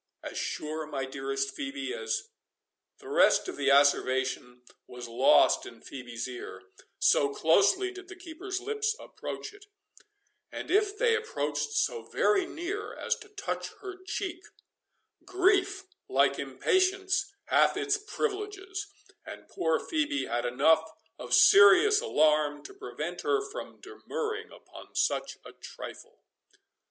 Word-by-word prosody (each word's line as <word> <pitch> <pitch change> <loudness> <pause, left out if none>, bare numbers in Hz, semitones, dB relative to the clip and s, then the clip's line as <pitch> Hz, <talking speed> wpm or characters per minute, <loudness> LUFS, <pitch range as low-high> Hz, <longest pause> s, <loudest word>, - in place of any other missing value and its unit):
"As - - -7
sure, 155 0 -4
my 140 -3 -3
dearest 135 +1 -3
Phœbe, 280 +3 -4
as"— 465 -1 -3 0.7
The 405 - -14
rest 440 0 +4
of 375 - -5
the - - -2
asseveration 130 -3 +2 0.2
was 125 -1 -8
lost 120 +3 +4
in - - -12
Phœbe's 120 -3 -7
ear, 120 -7 -8 0.3
so 140 0 +3
closely 200 - +3
did 375 0 -11
the 370 - -10
keeper's 365 +2 -6
lips 435 +2 -1
approach 425 - -7
it; 410 0 -17 0.8
and - - -6
if 415 +1 +2
they 470 -1 +3
approached 445 -1 -2
so 465 0 0
very 390 -4 +1
near 395 +6 -5
as - - -1
to 430 -1 -14
touch 410 -1 -5
her 380 -1 -9
cheek, 370 -2 -4 0.8
grief, 385 +1 +2 0.3
like - - +2
impatience, 380 +1 +1
hath - - +3
its 415 0 0
privileges, 405 -2 -4 0.4
and - - -11
poor 160 -1 +1
Phœbe 300 -3 -1
had 120 +1 -2
enough 160 +6 +3 0.3
of 125 0 0
serious 200 - +7
alarm 150 - +2
to - - -10
prevent 395 +1 -6
her 410 -1 0
from - - -8
demurring 445 0 -5
upon - - -14
such - - 0
a - - -10
trifle. - - -11
375 Hz, 130 wpm, -29 LUFS, -, 0.8 s, serious